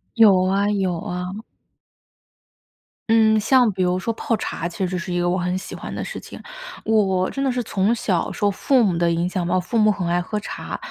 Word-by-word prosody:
有 200 -5 +6
啊， 195 +2 +1
有 190 -4 0
啊。 180 +1 -4 1.8
嗯， 220 -1 +5
像 245 +1 +4
比 185 -1 -1
如 180 0 +1
说 230 +5 -2
泡 230 - -1
茶 170 -4 -4
其 180 +2 -3
实 180 0 -3
是 175 +1 -4
一 175 - 0
个 175 - +1
我 180 - +1
很 180 +1 -1
喜 190 - -8
欢 - - -7
的 - - -3
事 - - -6
情。 - - -11 0.5
我 220 -1 +3
我 185 -1 0
真 275 - -4
的 270 - +1
是 245 -1 -1
从 205 +2 +1
小 190 -6 -1
受 205 -1 +1
父 255 +5 +2
母 185 -5 +1
的 170 0 +2
影 170 +2 0
响 180 -2 -2
吧， 180 - +1
我 - - +3
父 230 +6 -3
母 215 -1 +5
很 200 -4 -1
爱 175 +1 +1
喝 210 +4 -4
茶， - - -6
190 Hz, 240 characters per minute, -22 LUFS, 180-220 Hz, 1.8 s, 有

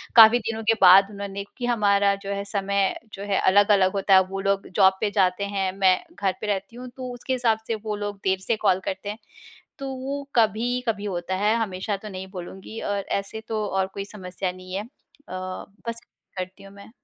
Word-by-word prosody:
काफ़ी 225 +1 +9
दिनों 225 0 -4
के 225 +1 +4
बाद 195 +2 +8
उन्होंने 200 -1 -5
क्योंकि 240 +4 -7
हमारा 200 -4 +3
जो 200 - -3
है 200 0 -3
समय 200 -1 0 0.2
जो 195 - -7
है 195 - +3
अलग-अलग 200 -1 +4
होता 195 0 +2
है। 190 - +9
वो 195 0 -4
लोग 195 0 0
जॉब 190 -1 +5
पे 210 - +1
जाते 190 -1 +2
हैं, 190 -1 +1
मैं 190 -2 +5 0.2
घर 195 -2 +1
पे 215 - -3
रहती 200 +2 -2
हूँ, 250 +1 -8
तो 255 -1 -5
उसके 245 +2 -3
हिसाब 240 -3 +2
से 230 - 0
वो 215 0 -4
लोग 205 -1 -5
देर 190 0 +1
से 205 +4 0
कॉल 185 -2 +4
करते 190 +2 -5
हैं। 210 - -5 0.6
तो 275 - -5
वो 275 +2 -4
कभी-कभी 230 -1 +1
होता 185 -2 -3
है, 210 +3 +2
हमेशा 205 -2 -2
तो 215 +2 -9
नहीं 190 -1 -6
बोलूँगी, 190 +4 -8
और 205 0 -1 0.2
ऐसे 200 +3 -6
तो 215 -1 -1
और 190 -1 0
कोई 200 - -4
समस्या 185 -2 -5
नहीं 185 0 -10
है। 195 - -1
अ, - - -14 0.4
बस, 185 +4 -6 0.4
करती 185 +1 -6
हूँ 195 0 -13
मैं। 200 +1 -13
200 Hz, 210 wpm, -24 LUFS, 190-220 Hz, 0.6 s, काफ़ी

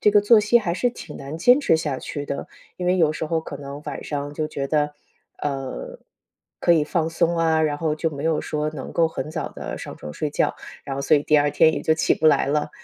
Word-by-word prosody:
这 210 - +5
个 205 0 +5
作 210 +2 +6
息 210 +3 +4
还 185 -7 -2
是 245 - +1
挺 - - -10
难 140 +3 -7
坚 245 +10 +5
持 165 - +3
下 150 -5 -2
去 145 -2 -5
的。 140 - -4 0.3
因 180 - -4
为 180 +1 +3
有 160 -4 +3
时 155 - -4
候 160 +1 0
可 150 - -7
能 140 +1 -8
晚 - - -5
上 145 -1 -4
就 155 0 -2
觉 140 -3 -3
得， 150 0 0 0.5
呃， 145 - -4 0.6
可 175 - +4
以 160 -2 +4
放 160 +2 0
松 170 +1 +1
啊， 160 -1 +3
然 150 -2 +1
后 155 -1 0
就 160 +1 -1
没 140 -2 -6
有 160 -1 +1
说 150 0 -2
能 150 -4 -7
够 165 - +3
很 155 -2 -5
早 160 0 -3
地 - - -6
上 - - -7
床 75 - -8
睡 150 - -2
觉， - - 0 0.3
然 135 -1 -5
后 - - -2
所 140 - +4
以 145 - 0
第 150 - +3
二 145 0 +2
天 160 +2 +5
也 - - -4
就 160 - +3
起 160 - +2
不 160 - +1
来 145 -4 +4
了。 150 +2 0
155 Hz, 275 characters per minute, -23 LUFS, 145-165 Hz, 0.6 s, 作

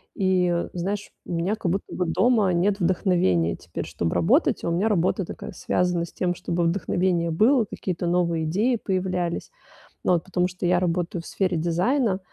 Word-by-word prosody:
И 180 -3 +1
знаешь, 195 +4 -3
у - - -5
меня 175 +6 0
как 180 -5 -2
будто 195 +2 -3
бы 180 - -1
дома 200 +3 +3
нет 195 +4 +1
вдохновения 170 - +2
теперь, - - -6
чтоб 85 -1 -2
работать, 85 -1 +2
а - - -1
у - - 0
меня 180 +6 +1
работа 185 -2 +1
такая, - - -8
связана 180 -1 0
с - - -15
тем, 180 -1 -1
чтобы 170 0 -2
вдохновение 170 -1 0
было, 225 - +4
какие-то 175 -2 -3
новые 170 -2 +1
идеи 215 +10 +1
появлялись. 185 - -2 0.5
Вот, 175 -2 +3
потому 180 -1 0
что 180 0 -6
я 175 0 +3
работаю 175 -1 -1
в - - -16
сфере 185 -3 0
дизайна. 185 - +1
180 Hz, 175 wpm, -24 LUFS, 170-190 Hz, 0.5 s, было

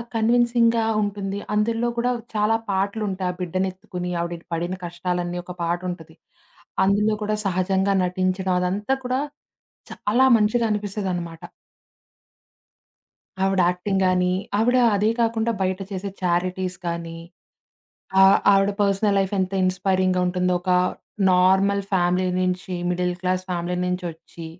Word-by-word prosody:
కన్విన్సింగ్‌గా 235 0 +3 0.2
ఉంటుంది. 200 -1 -3
అందుల్లో 230 +3 +1
కూడా 245 +1 +1 0.2
చాలా 215 +1 +2
పాటలుంటాయి. 195 -1 -1
ఆ - - -17
బిడ్డనెత్తుకొని 180 0 -3
ఆవిడి 170 0 -3
ని - - -29
పడిన 175 +2 -2
కష్టాలన్నీ 175 0 -3
ఒక 180 0 -8
పాటుంటది. 170 -1 -4 0.7
అందులో 210 +2 +2
కూడా 215 0 0
సహజంగా 190 +1 +1
నటించడం 185 +1 -1
అదంతా 200 +8 0
కూడా 255 +1 0 0.7
చాలా 240 +6 +2
మంచిగా 220 +2 +2
అనిపిస్తదనమాట. 190 -5 -3 2.0
ఆవిడ 195 -1 +2
యాక్టింగ్ 190 +2 -1
గానీ, 180 0 +2 0.2
ఆవిడ 245 +4 +3 0.2
అదే 210 +2 +2
కాకుండా, 230 0 +1
బయట 185 0 0
చేసే 195 +1 -4
చారిటీస్‌ 180 +1 -1
గానీ. 170 -1 -4 1.0
ఆహ్, 195 +1 +7
ఆవిడ 195 0 +4
పర్సనల్ 200 +1 +2
లైఫెంత 190 -1 0
ఇన్స్పైరింగుంటుందో, 185 -1 +1
ఒక 185 +1 -3 0.6
నార్మల్ 190 +2 +3
ఫ్యామిలీ 180 0 +2
నుంచి, 185 0 -2 0.2
మిడిల్ 180 0 0
క్లాస్ 185 0 0
ఫ్యామిలీ 175 0 -2
నుంచొచ్చి. 175 -2 -5
185 Hz, 110 wpm, -23 LUFS, 180-205 Hz, 2.0 s, ఆహ్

